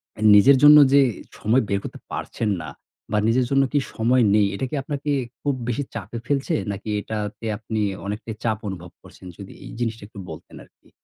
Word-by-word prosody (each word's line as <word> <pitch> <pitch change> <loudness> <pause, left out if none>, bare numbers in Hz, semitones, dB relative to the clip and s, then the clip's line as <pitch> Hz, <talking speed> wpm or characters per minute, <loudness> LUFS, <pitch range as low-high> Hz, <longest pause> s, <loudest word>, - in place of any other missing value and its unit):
অ্যা - - -11
নিজের 130 +7 +7
জন্য 150 0 +10 0.2
যে 140 - +7 0.4
সময় 120 +5 +2
বের 100 - +1
করতে - - -8
পারছেন 110 - -3
না 80 - -7 0.4
বা 105 - +1
নিজের 125 +2 +2
জন্য 135 0 +4
কি 145 - +4
সময় 120 +2 +2
নেই, 105 -2 +4
এটা 130 - -2
কি - - -4
আপনাকে 145 0 -3 0.3
খুব 145 - 0
বেশি 125 +4 -1
চাপে 110 +2 -6
ফেলছে? 140 +3 0 0.2
নাকি 100 +2 -6
এটাতে 105 +1 -5
আপনি 110 -1 -3 0.2
অনেকটাই 105 +2 -5
চাপ 110 -2 0
অনুভব 90 -2 -7
করছেন? 95 - -14
যদি 100 -1 -10
এই - - -9
জিনিসটা 115 -3 -3
একটু 105 - -12
বলতেন - - -11
আরকি। - - -26
115 Hz, 190 wpm, -23 LUFS, 105-135 Hz, 0.4 s, জন্য